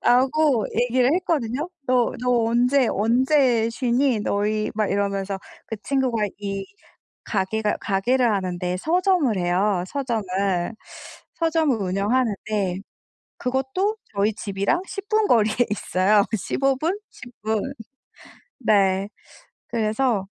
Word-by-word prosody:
라고 265 -1 +3
얘기를 250 +2 +2
했거든요. 300 -4 -1 0.2
"너 250 -2 +2
너 245 -2 +2
언제 245 +3 +3
언제 240 +1 +2
쉬니 245 -1 +1
너희?" 210 +1 0
막 215 -1 0
이러면서 200 -1 -1 0.3
그 225 - -5
친구가 255 -6 0
이 195 -1 -4 0.6
가게가 210 +1 -1
가게를 235 +4 +1
하는데 180 -2 -2
서점을 345 - +2
해요 180 +1 +1
서점을. 240 -5 -2 1.1
서점을 320 -6 +1
운영하는데 200 -1 0 0.6
그것도 265 - -1 0.2
저희 205 +2 +2
집이랑 200 - -1
10 395 +1 -7
분 430 -1 +3
거리에 215 -2 +3 0.2
있어요 200 0 +2
15 270 +7 0
분 340 +8 -1
10 245 -1 -12
분. 220 +5 -1 0.9
네. 195 -3 +2 0.6
그래서 220 -2 0
230 Hz, 220 characters per minute, -23 LUFS, 200-265 Hz, 1.1 s, 라고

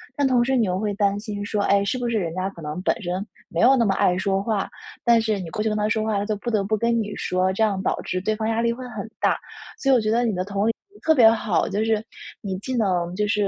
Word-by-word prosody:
但 285 -2 +2
同 245 -2 +3
时 265 +1 +1
你 230 -5 +2
又 180 0 0
会 210 0 -1
担 200 0 +1
心 205 -2 -5
说： 205 +1 -2
“哎， 200 0 +3
是 200 +6 -1
不 245 -1 -2
是 235 - -1
人 165 -4 -3
家 185 +1 -1
可 170 - -12
能 150 +2 -5
本 225 - 0
身 185 +1 -3 0.2
没 - - -3
有 260 +3 +6
那 240 - +3
么 200 -3 +2
爱 180 - +3
说 195 +1 0
话。 210 -2 -1 0.3
“但 235 -1 +5
是 215 -2 0
你 175 -3 -6
过 210 +7 -3
去 220 - +1
跟 210 - -1
他 210 0 +1
说 215 0 +1
话， 215 -1 0
他 - - -1
就 215 0 -1
不 235 +4 -4
得 210 -3 +1
不 215 +2 0
跟 235 +2 +1
你 210 -1 -5
说。 185 +1 0
这 220 - +1
样 200 -3 +1
导 - - -1
致 185 - -2
对 215 +3 0
方 220 0 -2
压 225 0 +1
力 235 0 +2
会 250 +2 -6
很 220 -2 -6
大。 - - +2 0.4
所 275 - +2
以 - - +6
我 - - +4
觉 215 -1 0
得 235 +2 +2
你 225 -4 0
的 180 0 -2
同 200 +1 -1
理 - - +4 0.2
心 415 - -19
特 320 0 +3
别 240 -5 +7
好， 220 -2 0
就 210 +2 -1
是 220 -1 +1 0.4
你 195 -3 -3
既 255 +6 -4
能 180 -5 0
就 210 +2 0
是 205 -1 +1
210 Hz, 330 characters per minute, -23 LUFS, 195-230 Hz, 0.4 s, 别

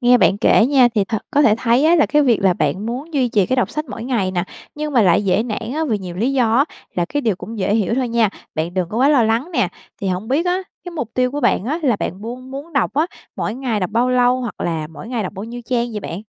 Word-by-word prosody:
nghe 245 0 +5
bạn 195 0 +3
kể 225 - +4
nha 260 -3 +5
thì 205 - +2
thật 220 +2 -2
có 290 - +3
thể 215 - +5
thấy 240 +4 +2
á, 335 +2 +5
là 315 - +4
cái 300 0 +3
việc 245 -6 +3
là 190 -2 +5
bạn 175 +7 -1
muốn 275 +7 -5
duy 255 -3 +2
trì 205 -5 +2
cái 260 - 0
đọc 250 - +1
sách 305 0 -3
mỗi 230 -3 -7
ngày 225 -8 0
nè, 180 -1 -1 0.3
nhưng 300 0 -4
mà 240 - +4
lại 190 +1 +3
dễ 195 +3 +2
nản 225 0 -4
á, 320 +1 0
vì 215 -4 +1
nhiều 180 -2 -7
lý 240 +8 0
do 235 -4 +2
á, 275 - +5 0.3
là 175 - +1
cái 290 +10 -2
điều 220 -7 +1
cũng 225 +4 -8
dễ 200 +1 +1
hiểu 220 0 +1
thôi 255 -1 0
nha, 230 -2 +2 0.3
bạn 165 +3 -2
đừng 185 -3 -1
có 215 - -5
quá 270 - +4
lo 285 -5 +5
lắng 230 +8 0
nè. 240 - +1 0.3
Thì 195 - -1
hổng 185 +5 -3
biết 310 +7 +1
á, 360 +1 +2 0.3
cái 355 - -6
mục 250 -9 -4
tiêu 250 0 +2
của 290 +2 -3
bạn 235 -5 +2
á, 295 +8 -1
là 245 -7 +2
bạn 190 +1 -4
buôn 250 +4 -7
muốn 280 +5 -8
đọc 280 - 0
á, 310 +4 +2 0.3
mỗi 210 - -2
ngày 245 -5 -2
đọc 185 - -2
bao 240 +3 +1
lâu? 250 0 +3
Hoặc 240 -3 -6
là 160 -2 -2
mỗi 160 +8 -11
ngày 240 -3 -2
đọc 190 - -5
bao 195 +1 -6
nhiêu 240 +2 -7
trang 240 -1 0
vậy 210 - -4
bạn? 185 +1 -6
235 Hz, 295 wpm, -19 LUFS, 205-265 Hz, 0.3 s, nghe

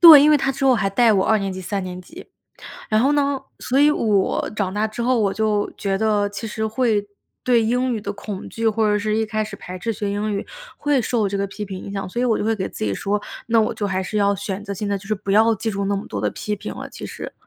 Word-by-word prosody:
对， 320 -5 +11
因 300 - +6
为 300 - +7
他 270 -1 0
之 270 - -3
后 260 -2 +6
还 215 -3 +1
带 225 +3 +4
我 190 -2 +3
2 220 - +3
年 195 -1 -2
级 185 - -6
3 195 +1 -3
年 180 0 -6
级。 330 - -12 0.6
然 215 0 +3
后 275 +5 +3
呢， 280 -2 +1 0.2
所 260 +1 0
以 295 +1 +6
我， 210 -9 +1
长 190 -3 -1
大 210 +1 +1
之 220 +2 -5
后， 250 +1 +2
我 200 -3 +1
就 210 -1 0
觉 195 -1 -1
得 210 -2 +2
其 205 +3 -6
实 220 +1 -2
会， 220 -2 +1 0.4
对 245 -2 +4
英 250 +3 +1
语 225 - -2
的 200 0 -4
恐 200 -1 -7
惧， 225 0 0
或 220 0 +2
者 210 - +2
是 215 +1 0
一 220 0 +1
开 215 0 -1
始 210 -1 -8
排 185 -1 -8
斥 225 +5 -2
学 205 -1 -3
英 205 +1 -1
语， 200 - -3 0.3
会 290 -3 +2
受 225 -3 +1
这 200 - -2
个 200 0 0
批 210 +2 -6
评 190 -2 -6
影 - - -7
响。 195 -2 -3
所 240 +6 -3
以 - - +2
我 230 -3 +2
就 - - -2
会 225 +1 +2
给 190 -3 -3
自 - - -5
己 100 - 0
说， 205 - -1 0.3
那 230 -1 +4
我 215 - 0
就 205 - -2
还 190 -1 -1
是 200 +3 -4
要 200 -1 +3
选 195 +1 -4
择 200 - -4
性 205 +2 -3
地 200 - +1
就 195 - -10
是 215 - 0
不 195 -1 -3
要 225 +2 +5
记 220 +2 -2
住 200 0 -2
那 200 0 0
么 200 - -5
多 100 - -4
的 105 - 0
批 210 - -3
评 - - -6
了， - - -7
其 - - -9
实。 - - -7
210 Hz, 305 characters per minute, -22 LUFS, 200-230 Hz, 0.6 s, 对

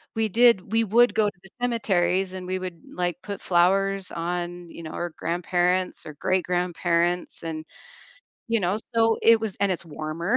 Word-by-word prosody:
we 225 0 +1
did 225 -2 +4
we 225 0 +3
would 235 +3 +4
go 215 -1 +3
to 180 - -19
the 190 - -9
cemeteries 190 -6 +1
and 185 -1 -6
we 185 0 -1
would, 180 -3 -7
like, 175 -1 -1
put 200 -2 -6
flowers 195 +2 +2
on, 175 0 -4
you 170 - -10
know, 155 - -7
our 175 0 -4
grandparents 180 +1 0
or 155 - -8
great 185 +4 +1
grandparents, 175 -1 0
and, 160 -1 -5 0.8
you 230 0 +2
know 180 +3 +1 0.2
so 225 0 +4
it 230 -1 +6
was 220 -4 -3
and 200 -1 +2
it's 175 - -4
warmer, 160 +6 -2
180 Hz, 180 wpm, -25 LUFS, 175-200 Hz, 0.8 s, it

